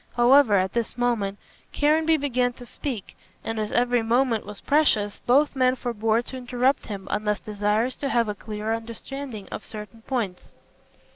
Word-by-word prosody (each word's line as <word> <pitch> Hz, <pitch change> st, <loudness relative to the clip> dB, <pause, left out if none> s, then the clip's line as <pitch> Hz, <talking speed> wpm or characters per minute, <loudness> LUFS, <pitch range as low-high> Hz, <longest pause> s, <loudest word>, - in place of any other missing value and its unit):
However, 245 Hz, -2 st, +6 dB
at 185 Hz, -1 st, +1 dB
this 235 Hz, 0 st, -2 dB
moment 225 Hz, -5 st, 0 dB, 0.3 s
Caranby 315 Hz, +2 st, +3 dB
began 250 Hz, -4 st, 0 dB
to 245 Hz, -, -12 dB
speak, 240 Hz, -5 st, -5 dB, 0.3 s
and 225 Hz, 0 st, -3 dB
as 215 Hz, -1 st, -2 dB
every 245 Hz, 0 st, +2 dB
moment 230 Hz, -1 st, +1 dB
was 210 Hz, -1 st, -7 dB
precious, 220 Hz, -9 st, +2 dB
both 280 Hz, +4 st, +4 dB
men 255 Hz, -1 st, +3 dB
forbore 230 Hz, -2 st, 0 dB
to 260 Hz, -, -7 dB
interrupt 250 Hz, +2 st, 0 dB
him 195 Hz, -2 st, -6 dB
unless 210 Hz, 0 st, 0 dB
desirous 210 Hz, +4 st, 0 dB
to 280 Hz, -, -2 dB
have 235 Hz, -3 st, +2 dB
a 210 Hz, -, -1 dB
clearer 210 Hz, +1 st, -4 dB
understanding 230 Hz, 0 st, -6 dB
on -, -, -4 dB
certain 215 Hz, +1 st, -9 dB
points. 225 Hz, -7 st, -4 dB
235 Hz, 160 wpm, -25 LUFS, 210-255 Hz, 0.3 s, However